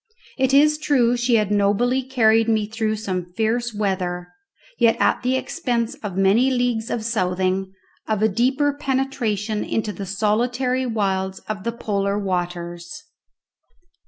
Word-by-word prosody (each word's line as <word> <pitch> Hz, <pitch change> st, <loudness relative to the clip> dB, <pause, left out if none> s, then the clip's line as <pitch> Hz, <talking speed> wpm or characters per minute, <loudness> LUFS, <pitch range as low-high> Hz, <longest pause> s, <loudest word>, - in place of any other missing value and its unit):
It 265 Hz, -1 st, +1 dB
is 300 Hz, +2 st, +4 dB
true 250 Hz, -6 st, +2 dB
she 240 Hz, 0 st, +2 dB
had 210 Hz, -2 st, +1 dB
nobly 210 Hz, +6 st, +2 dB
carried 225 Hz, -3 st, +3 dB
me 215 Hz, -2 st, +2 dB
through 220 Hz, 0 st, -2 dB
some 185 Hz, -5 st, -4 dB
fierce 230 Hz, +4 st, 0 dB
weather, 185 Hz, -4 st, -2 dB, 0.5 s
yet 230 Hz, -1 st, +4 dB
at -, -, +2 dB
the 255 Hz, +1 st, +1 dB
expense 245 Hz, -5 st, -2 dB
of 195 Hz, -4 st, -5 dB
many 200 Hz, +7 st, +4 dB
leagues 245 Hz, -3 st, 0 dB
of 220 Hz, -2 st, -3 dB
southing, 190 Hz, -3 st, 0 dB, 0.4 s
of 215 Hz, -1 st, 0 dB
a -, -, +6 dB
deeper 260 Hz, +7 st, +1 dB
penetration 255 Hz, -7 st, -1 dB
into 215 Hz, -2 st, -2 dB
the 200 Hz, -1 st, -6 dB
solitary 245 Hz, +6 st, 0 dB
wilds 190 Hz, -4 st, -1 dB
of 215 Hz, -3 st, -4 dB
the 235 Hz, -, 0 dB
polar 200 Hz, -3 st, -1 dB
waters. 175 Hz, -, -4 dB
220 Hz, 140 wpm, -22 LUFS, 195-245 Hz, 0.5 s, a